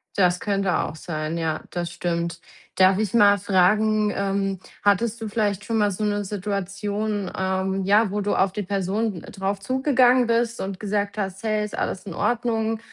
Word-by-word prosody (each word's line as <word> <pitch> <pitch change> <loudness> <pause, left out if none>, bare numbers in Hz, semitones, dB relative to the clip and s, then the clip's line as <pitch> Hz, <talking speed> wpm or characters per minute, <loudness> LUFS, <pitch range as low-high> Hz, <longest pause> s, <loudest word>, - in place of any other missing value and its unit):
Das 180 -2 +3
könnte 195 -3 0
auch 155 - -2
sein, 155 0 -4
ja, 160 -1 -1
das 175 -1 -3
stimmt. 170 -1 -2 0.4
Darf 190 +1 +5
ich 215 -2 -1
mal 205 -2 +6
fragen, 210 +3 +3
ähm 195 -1 -1 0.2
hattest 210 +3 +2
du 220 - -3
vielleicht 205 -2 -1
schon 225 -1 -1
mal 205 -1 +3
so 200 +2 -4
'ne 205 0 0
Situation, 200 +1 -3
ähm, 190 0 -1
ja, 205 +1 +3
wo 205 0 -1
du 205 - 0
auf 190 -1 +2
die 210 - -3
Person 200 +1 -1
drauf 195 0 -2
zugegangen 255 0 +3
bist 235 0 0
und 190 -1 -4
gesagt 205 0 -2
hast: 195 -1 -3
„Hey, 215 -1 0
ist 210 - -7
alles 190 - -3
in 185 - -6
Ordnung?“, 225 -1 0
200 Hz, 175 wpm, -24 LUFS, 190-215 Hz, 0.4 s, mal